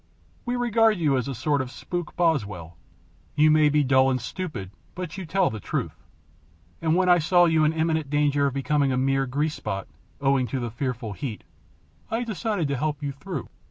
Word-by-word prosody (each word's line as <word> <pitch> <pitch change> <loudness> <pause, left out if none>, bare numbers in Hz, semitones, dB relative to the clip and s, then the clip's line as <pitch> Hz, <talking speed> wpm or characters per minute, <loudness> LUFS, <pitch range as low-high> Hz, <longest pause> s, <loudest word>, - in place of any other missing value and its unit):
We 245 0 -1
regard 225 -3 +3
you 150 -5 +2
as 130 0 -1
a 135 - -3
sort 140 +5 0
of 130 - -5
spook 175 +4 -5
Boswell. 105 - 0 0.6
You 155 +1 +5
may 155 -1 +5
be 150 0 +3
dull 130 0 +4
and 130 -1 0
stupid, 120 - -5 0.2
but 180 -1 -5
you 190 -4 -6
tell 190 +2 +2
the 110 - -5
truth, - - -4 0.8
and 160 0 +2
when 185 0 +2
I 175 -1 +6
saw 175 +3 +4
you 160 -2 +3
in 155 - +3
imminent 160 -2 0
danger 145 -1 +2
of 135 - -2
becoming 140 0 +1
a 130 - 0
mere 135 +1 +1
grease 150 +4 -1
spot, 100 -7 -4 0.3
owing 135 -2 +2
to 130 +4 -3
the 120 -2 -4
fearful 120 -3 -3
heat, 115 0 -6 0.7
I 225 +2 -1
decided 215 -6 -2
to 140 - -1
help 150 +1 -2
you 140 - -1
through. 140 0 -6
145 Hz, 195 wpm, -25 LUFS, 130-170 Hz, 0.8 s, I